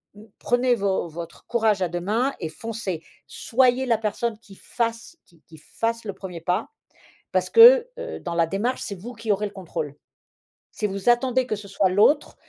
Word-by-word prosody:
N 215 +2 -15
prenez 245 0 +2
vo 195 -4 -1
votre 165 +1 -9
courage 220 -5 +1
à 180 - +2
deux 175 +1 -3
mains 230 +9 0
et 160 -3 -4
foncez. 200 -3 -5 0.2
Soyez 255 +1 +1
la 230 -2 +3
personne 220 +1 -2
qui 200 -4 -16
fasse, 230 - -4
qui 165 -2 -26
qui 160 - -14
fasse 230 +8 -3
le 200 - -4
1er 180 -3 -8
pas.» 180 +5 -1 0.6
Parce - - +1
que, 480 +1 +8
heu, - - -6
dans 170 -1 -5
la 165 -1 +2
démarche, 215 +9 -2
c'est 200 - -4
vous 240 +6 -9
qui 225 -1 -1
aurez 210 +1 -1
le 205 - -8
contrôle. 155 -6 -6 0.8
Si 210 - -2
vous 195 +3 -1
attendez 255 +1 +2
que 215 - -2
ce 200 0 -10
soit 195 -1 +1
l'autre, 215 +11 +3
215 Hz, 190 wpm, -24 LUFS, 185-240 Hz, 0.8 s, que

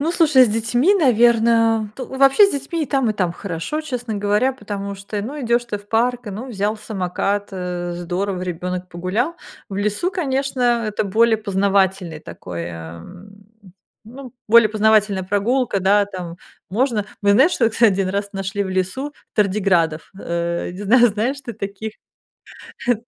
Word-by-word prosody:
Ну, 310 +4 0
слушай, 310 -7 +5
с 240 - 0
детьми, 240 - +2
наверно 230 - +3
то 260 - -6
ну, 265 - -8
вообще 275 +9 +6
с - - -2
детьми 285 +4 -3
и 295 - -2
там, 265 -4 +1
и - - 0
там 185 -4 -1
хорошо, 175 - -4
честно 250 -7 -4
говоря. 205 +6 +1
Потому 200 -6 -6
что, 200 +2 -5
ну, 285 +7 -6
идешь 240 -1 +1
ты 215 -4 -4
в 205 0 -19
парк, 245 +3 +1
ну, 210 +6 -6
взял 210 -1 -1
самокат, 200 0 -2
э, 180 -1 -4
здорово, 180 +2 -3
ребенок 180 +1 -4
погулял. 185 - -2 0.3
В 195 - -6
лесу, 210 - 0
конечно, 275 -7 -2 0.2
это 210 0 -1
более 225 +3 +3
познавательное 195 -4 0
такое, 85 - -7 0.2
эм, 190 - -13 0.7
ну, 250 +3 -11 0.2
более 230 0 +7
познавательная 215 -2 +2
прогулка, 205 +4 0
да, 200 +2 +4
там. 180 -4 -7 0.3
Можно 220 -1 0 0.2
мы 200 - +4
знаешь, 270 - +5
что 230 -2 +2
кстати, 225 -1 +4
1 190 0 -1
раз 200 +2 -3
нашли 195 +1 -3
в 190 - -5
лесу 190 +11 -2 0.2
тардиградов. 185 -6 +1
Э, 170 -1 -2
не 185 +3 -8
знаю, 240 +4 +5
знаешь 230 +7 -2
ты 235 - -5
таких, 205 +1 -6 1.0
э. 245 - +5
210 Hz, 165 wpm, -20 LUFS, 190-245 Hz, 1.0 s, более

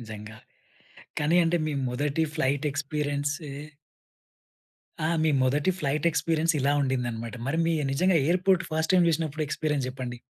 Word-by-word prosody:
నిజంగా. 110 -1 -9 0.8
కానీ 155 +4 +3
అంటే 165 +1 +2
మీ 155 - -2 0.2
మొదటి 145 +5 0
ఫ్లైట్ 145 0 0
ఎక్స్‌‌పిరియన్సే 145 0 -2 1.5
ఆ! - - +1
మీ 160 - +3
మొదటి 145 +7 +2
ఫ్లైట్ 150 +1 -1
ఎక్స్‌పిరియన్స్ 165 +1 +1
ఇలా 140 +2 +2
ఉండిందన్నమాట. 120 -3 -2
మరి 160 +4 0
మీ 165 - +2 0.2
నిజంగా 180 +5 +3
ఎయిర్‌పో‌ర్ట్ 185 +2 +2
ఫస్ట్ 160 +3 +1
టైమ్ 180 -2 +5
చూసినప్పుడు 155 -1 -1
ఎక్స్‌పి‌రియన్స్ 150 -3 -1
చెప్పండి? 125 -2 -6
150 Hz, 135 wpm, -27 LUFS, 135-160 Hz, 1.5 s, టైమ్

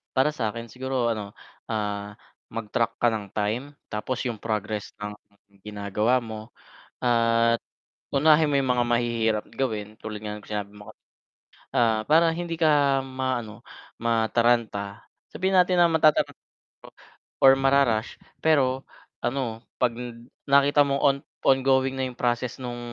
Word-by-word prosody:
Para 130 +3 +4
sa'kin 115 -2 -3
siguro 130 +1 -4 0.2
ano 110 -2 -3 0.5
ah, 105 -2 -3 0.3
mag-track 115 +1 -1
ka 120 - +5
ng 105 -2 -3
time, 110 +4 0 0.3
tapos 125 +5 -3
yung 115 -4 -3
progress 105 -1 -3
ng 105 0 -5 0.5
ginagawa 105 +4 0
mo, 110 -2 -6 0.5
at 115 -1 +3 0.6
unahin 155 +2 +5
mo - - +1
yung 130 -1 -1
mga 120 -1 +1
mahihirap 115 -2 +1
gawin, 110 -5 -3
tulad 105 -1 -6
nga 105 -1 -5
ng 105 - -12
sinabi 105 -1 -4
mo 105 +1 -12
kan - - -49 0.8
ah, 115 -2 +3
para 165 +2 +5
hindi 170 0 -4
ka 145 -4 +3
maano, 130 -5 -4 0.4
mataranta 115 -3 +1 0.3
sabihin 190 +1 +1
natin 180 -1 +4
na 170 - +6
matatat 155 -2 +4 1.1
or 135 0 +8
mara-rush 135 -4 +2 0.2
pero, 135 -4 +2 0.4
ano 120 -3 -2 0.2
'pag 120 -2 +2
n 120 -1 -8 0.2
nakita 140 +1 +5
mo 140 -1 0
on-ongoing 135 -1 +2
na 130 - -2
yung 125 -1 -11
process 120 0 -1
nung 120 -1 -5
120 Hz, 135 wpm, -25 LUFS, 110-135 Hz, 1.1 s, or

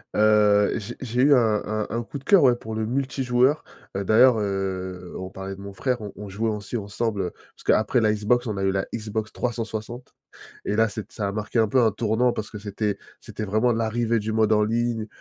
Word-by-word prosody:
heu, 105 -1 +4
j'ai 105 - -6
j'ai 125 0 -1
eu 145 +1 +6
un 110 -5 +3
un 110 0 -2
un 115 +1 -2
coup 140 - -7
de 135 - -12
cœur, 195 -7 +6
ouais, 125 -2 +5
pour 110 -2 -8
le 110 0 -1
multijoueur. 130 +2 +1 0.3
Heu, 100 - -1
d'ailleurs, 120 +3 +6
heu, 95 -2 -3
on 95 0 -6
parlait 95 0 -7
de - - -14
mon 100 0 -8
frère, 125 +5 -1
on 105 - -6
on 105 -1 -8
jouait 110 +4 -1
aussi 105 +3 -4
ensemble, 105 0 -2
heu, 90 - -2 0.2
parce - - -17
qu'après 110 +3 +3
la 105 -1 +3
Xbox, 120 +4 +1
on 105 - -2
a 95 - -2
eu 95 - +2
la 95 0 -1
Xbox 110 -1 -3
360 115 0 -4 0.5
et 105 - -1
là 110 0 +3
c'est 105 -1 -7
ça 105 -3 -3
a - - -2
marqué 105 +3 -3
un 110 - +4
peu 130 - +3
un 110 -2 +4
tournant, 115 +3 +1
parce 110 - -5
que 105 - -6
c'était 100 0 -2 0.2
c'était 110 - -6
vraiment 110 +5 +2
l'arrivée 115 0 0
du 110 +1 -3
mode 110 -1 +2
en 105 0 +4
ligne, 115 0 -1
110 Hz, 230 wpm, -24 LUFS, 105-120 Hz, 0.5 s, eu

